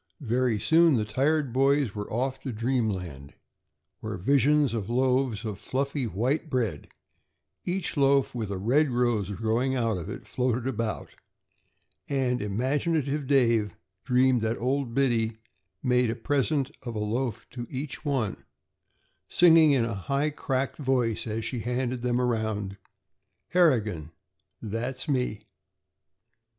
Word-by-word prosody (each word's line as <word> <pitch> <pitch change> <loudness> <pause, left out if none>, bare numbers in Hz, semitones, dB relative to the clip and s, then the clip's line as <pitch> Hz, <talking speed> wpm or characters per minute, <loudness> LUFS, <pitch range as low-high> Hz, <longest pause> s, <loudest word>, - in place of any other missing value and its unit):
Very 125 -3 +1
soon 165 +3 +4
the 110 - 0
tired 135 +4 0
boys 135 -3 +2
were 105 -1 -6
off 130 +3 -1
to 130 0 -5
dreamland, 105 - -2 0.6
where - - -5
visions 140 +5 +3
of 110 -3 -3
loaves 125 -2 +1
of 105 -3 -4
fluffy 140 0 -2
white 130 - -1
bread, 115 - -2 0.8
each 185 +1 -1
loaf 140 -1 +3
with 115 -4 -3
a 100 - -3
red 135 +10 +2
rose 120 -5 +1
growing 115 +6 0
out 115 -6 0
of 85 - -7
it, - - -8
floated 125 -1 -1
about, 115 - -3 1.0
and 130 -3 0
imaginative 140 - -1
Dave 115 -6 +2 0.3
dreamed 125 -1 +3
that 110 +1 -1
old 130 -1 -1
Biddy 115 -5 +1 0.5
made 125 -2 +2
a 115 - -1
"prisint" 140 +3 0
of 120 -3 -6
a - - -2
loaf 115 +1 -2
to 120 -1 -6
each 140 +3 -5
one, 135 -9 -1 0.9
singing 165 -3 +6
in 130 -5 +3
a 115 - -3
high 140 +10 -1
cracked 135 -2 -2
voice 125 -6 0
as 110 0 -3
she 125 +1 -3
handed 125 +1 -2
them 125 0 0
around: 110 -5 -1 0.7
"Harrigan! 110 - +2 0.5
That's 120 +6 -3
me!" 125 -7 -1
125 Hz, 135 wpm, -27 LUFS, 110-135 Hz, 1.0 s, singing